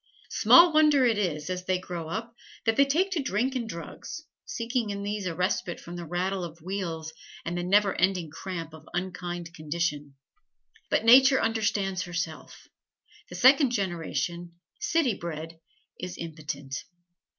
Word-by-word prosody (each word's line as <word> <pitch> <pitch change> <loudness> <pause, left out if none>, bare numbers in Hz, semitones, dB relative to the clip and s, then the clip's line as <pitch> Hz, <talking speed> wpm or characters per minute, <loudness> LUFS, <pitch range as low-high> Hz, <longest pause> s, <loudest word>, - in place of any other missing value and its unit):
Small 345 -1 +7
wonder 300 -4 +5
is 185 -10 0
it, 185 - -1
as 180 0 -6
they 185 0 +1
grow 175 -3 -6
up, 225 +6 -5 0.3
that 225 -1 +3
they 275 - +5
take 360 +8 +2
to 345 -5 0
drink 260 0 0
and 240 -4 -3
drugs, 170 - -7 0.2
seeking 230 -1 -2
in 200 0 -4
these 205 -1 -3
a 165 - -3
respite 180 0 -1
from 175 - -9
the 175 -1 -6
rattle 180 +3 -1
of 170 -1 -7
wheels 165 -3 -4 0.3
and 170 +1 -2
the 175 - -1
never 195 +2 +3
ending 180 -4 +1
cramp 165 -2 -6
of 160 0 -13
unkind 175 -2 -4
condition. 150 -3 -3 0.7
But - - +1
Nature 265 +3 +8
understands 205 -4 0
herself: 175 -3 -5 0.6
the - - -8
second 265 0 +6
generation, 175 -3 -2 0.3
city 330 - +2
bred, 165 -2 -6 0.4
is 180 0 -6
impotent. 145 -4 -6
185 Hz, 150 wpm, -27 LUFS, 170-225 Hz, 0.7 s, Nature